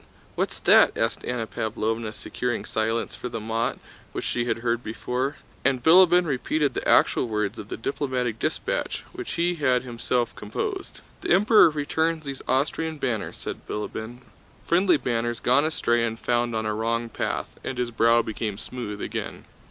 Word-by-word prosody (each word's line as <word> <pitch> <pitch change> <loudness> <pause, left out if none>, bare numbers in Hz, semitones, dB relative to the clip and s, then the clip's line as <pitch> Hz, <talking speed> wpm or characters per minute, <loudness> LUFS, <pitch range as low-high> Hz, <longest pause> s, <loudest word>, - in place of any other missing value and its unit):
What's - - -2
that?" - - +6
asked - - 0
Anna 120 -2 -1
Pávlovna, 110 0 -2
securing 125 -2 -3
silence 115 +1 -1
for 125 - -6
the 115 - -4
mot, 115 +2 -1 0.4
which - - -4
she 120 -1 0
had 120 - 0
heard 120 +1 +1
before. 125 +5 -2 0.3
And 130 -2 +2
Bilíbin 180 +1 +7
repeated 145 0 0
the - - -2
actual - - +4
words 105 -2 -2
of 100 - -7
the - - -4
diplomatic 125 -2 -2
dispatch, - - -2
which - - -6
he 175 +1 +1
had 130 -3 +3
himself 120 0 -1
composed. 385 - -4 0.2
"The - - -4
Emperor 205 +1 +6
returns 160 +1 -1
these 140 -1 -5
Austrian 155 +4 0
banners," 120 -7 -2
said - - -7
Bilíbin, 110 +3 -5 0.4
"friendly 180 0 +4
banners 120 -3 -1
gone 130 +7 +3
astray 120 -7 +1
and 115 -1 -1
found 120 -1 0
on 110 0 -1
a 105 - 0
wrong 115 +2 -1
path," 115 - -4
and 130 - -4
his 125 -1 -1
brow 115 +1 +4
became 110 -2 -3
smooth 110 -2 -6
again. - - -5
120 Hz, 165 wpm, -25 LUFS, 115-145 Hz, 0.4 s, Bilíbin